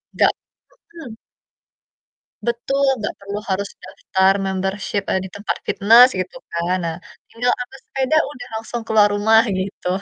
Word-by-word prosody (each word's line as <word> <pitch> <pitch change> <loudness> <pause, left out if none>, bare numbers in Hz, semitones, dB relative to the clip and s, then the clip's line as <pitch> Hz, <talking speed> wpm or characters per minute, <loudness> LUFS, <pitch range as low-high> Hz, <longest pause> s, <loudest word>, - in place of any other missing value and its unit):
nggak - - +4 0.6
mhm. 320 -9 -9 1.3
Betul, 240 +4 -1 0.2
gak - - -2
perlu 200 +1 -5
harus 195 +1 -1
daftar 190 +1 +1
membership, 190 +1 -2
eee, 190 - +1
di 190 - -8
tempat 205 +1 -3
fitnes 230 +5 +7
gitu 185 +6 -5
kan, 170 +2 -1
nah 165 -1 -3 0.3
tinggal 245 +2 0
ambil 265 +2 -7
sepeda 270 +3 0
udah 270 -4 -10
langsung 230 +1 -5
keluar 215 -2 +5
rumah 220 +2 +5 0.2
gitu. 185 -1 -4
205 Hz, 140 wpm, -20 LUFS, 190-240 Hz, 1.3 s, fitnes